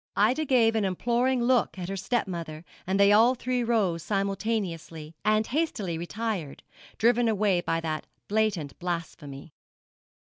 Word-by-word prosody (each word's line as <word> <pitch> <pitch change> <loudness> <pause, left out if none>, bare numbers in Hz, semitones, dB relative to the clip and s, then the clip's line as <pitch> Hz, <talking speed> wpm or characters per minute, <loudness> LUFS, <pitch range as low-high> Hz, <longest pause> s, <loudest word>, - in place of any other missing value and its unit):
Ida 250 +10 +2
gave 235 -5 +3
an 220 - +1
imploring 240 +6 +1
look 245 -5 +2
at 180 -2 -5
her 195 - -4
stepmother, 175 -7 -3 0.2
and 190 +1 0
they 200 0 +6
all 230 +5 +5
three 250 0 -1
rose 205 -8 +1
simultaneously, 195 -5 -3
and 215 +1 +2
hastily 240 - -2
retired, 175 -2 -4 0.3
driven 240 +1 +3
away 205 -4 +2
by 165 -1 -1
that 155 -1 -4 0.2
blatant 205 -9 -1
blasphemy. 160 -5 -6
200 Hz, 135 wpm, -27 LUFS, 170-230 Hz, 0.3 s, they